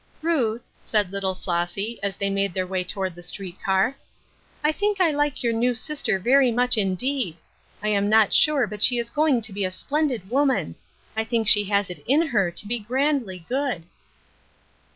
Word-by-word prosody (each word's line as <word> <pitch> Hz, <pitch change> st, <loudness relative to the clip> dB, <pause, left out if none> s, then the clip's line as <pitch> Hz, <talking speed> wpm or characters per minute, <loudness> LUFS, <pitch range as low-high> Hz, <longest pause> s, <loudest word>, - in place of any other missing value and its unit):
" -, -, -34 dB
Ruth," 245 Hz, -9 st, 0 dB
said 210 Hz, -4 st, 0 dB
little 195 Hz, -1 st, -1 dB
Flossy, 180 Hz, +5 st, -3 dB
as 200 Hz, -1 st, -2 dB
they 200 Hz, 0 st, -1 dB
made 195 Hz, -2 st, -1 dB
theii 185 Hz, -1 st, -1 dB
way 185 Hz, 0 st, -2 dB
toward 190 Hz, 0 st, -3 dB
the 175 Hz, -, -12 dB
street 180 Hz, +1 st, -5 dB
car. 195 Hz, +7 st, +1 dB, 0.3 s
" -, -, -34 dB
I 300 Hz, -, +3 dB
think 410 Hz, +4 st, -1 dB
I 350 Hz, -4 st, +4 dB
like 290 Hz, -2 st, -1 dB
your 235 Hz, -1 st, +1 dB
new 240 Hz, +2 st, +1 dB
sister 245 Hz, -3 st, -1 dB
very 250 Hz, +6 st, +3 dB
much, 245 Hz, +2 st, +4 dB
indeed. 210 Hz, -, -1 dB, 0.5 s
I 215 Hz, -, +1 dB
am 205 Hz, -1 st, +1 dB
not 220 Hz, -1 st, +4 dB
sure 295 Hz, -5 st, +4 dB
but 210 Hz, -1 st, -8 dB
she 245 Hz, +2 st, +5 dB
is 235 Hz, 0 st, -2 dB
going 295 Hz, -4 st, +2 dB
to 220 Hz, -2 st, -5 dB
be 200 Hz, 0 st, -2 dB
a 185 Hz, -, 0 dB
splendid 270 Hz, 0 st, -2 dB
woman. 265 Hz, -, +1 dB, 0.4 s
I 220 Hz, -, +1 dB
think 225 Hz, -1 st, -1 dB
she 205 Hz, -1 st, +6 dB
has 200 Hz, -1 st, 0 dB
it 180 Hz, -, -10 dB
in 290 Hz, +6 st, +4 dB
her 195 Hz, -7 st, +2 dB
to 175 Hz, +4 st, -5 dB
be 240 Hz, +2 st, -2 dB
grandly 240 Hz, -, -1 dB
good." 260 Hz, -, -2 dB
220 Hz, 195 wpm, -24 LUFS, 195-265 Hz, 0.5 s, she